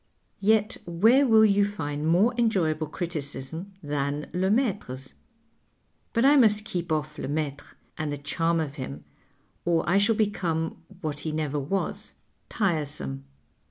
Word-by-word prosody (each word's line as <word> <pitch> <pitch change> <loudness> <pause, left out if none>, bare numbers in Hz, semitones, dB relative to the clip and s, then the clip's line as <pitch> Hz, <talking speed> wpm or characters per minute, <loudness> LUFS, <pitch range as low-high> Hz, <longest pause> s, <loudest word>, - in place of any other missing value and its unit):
'' - - -43
Yet 215 -1 +2
where 225 +11 +4
will 220 -2 +7
you 205 -1 +4
find 155 -7 -3
more 190 +9 +4
enjoyable 175 -10 +1
criticism 160 +2 -5
than 145 0 -2
Lemaitre's? 190 - -1 1.0
But 230 +2 +2
I 290 +2 +7
must 215 -4 +4
keep 175 -5 -4
off 150 -1 -1
Lemaitrc 145 0 -4 0.2
and 155 -1 -2
the 145 - -3
charm 165 +4 0
of 150 -2 -3
him, 75 - -6 0.6
or 170 -1 +1
I 185 +3 +4
shall 215 +3 +3
become, 175 -7 -1 0.2
what 150 -2 -3
he 155 - -3
never 150 -2 -1
was, 175 +8 -2 0.3
tiresome. 145 - -1
165 Hz, 135 wpm, -26 LUFS, 145-205 Hz, 1.0 s, will